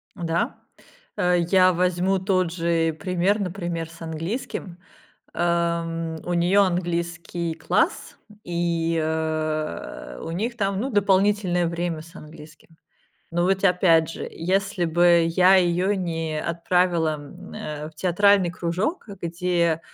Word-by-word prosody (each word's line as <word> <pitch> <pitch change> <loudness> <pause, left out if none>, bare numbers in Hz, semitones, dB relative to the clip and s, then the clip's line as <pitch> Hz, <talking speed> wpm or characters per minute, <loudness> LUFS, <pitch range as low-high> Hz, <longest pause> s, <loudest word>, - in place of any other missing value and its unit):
Да, 170 +8 -1 0.6
э, 180 0 +2
я 185 -1 +5
возьму 180 +2 +1
тот 185 -2 +1
же 165 -2 +1
пример, 185 +3 +1
например, 175 -3 -3
с 165 0 -15
английским. 170 +2 -5 0.6
Э, - - -4 0.4
м, 165 -1 -4
у 175 - -2
нее 175 +4 +3
английский 170 -2 -1
класс, 160 - 0 0.3
и, 170 -1 -1
э, 155 - -3
у - - -5
них 230 +7 -2
там, 195 -2 -1
ну, 270 +3 -2
дополнительное 195 -3 +2
время 170 -1 -3
с 165 +2 -16
английским. 155 0 -13 0.6
Но 175 +1 +1
вот 190 +1 +1
опять 170 -4 +4
же, - - -6
если 190 +1 -1
бы 170 0 +4
я 185 +3 +5
ее 180 +3 +2
не 165 -4 -2
отправила, 170 -1 +1
м, 145 -1 -12
э, 150 0 -6
в - - -29
театральный 185 +2 +3
кружок, 180 - -2
где, 170 -1 0
175 Hz, 125 wpm, -24 LUFS, 165-185 Hz, 0.6 s, я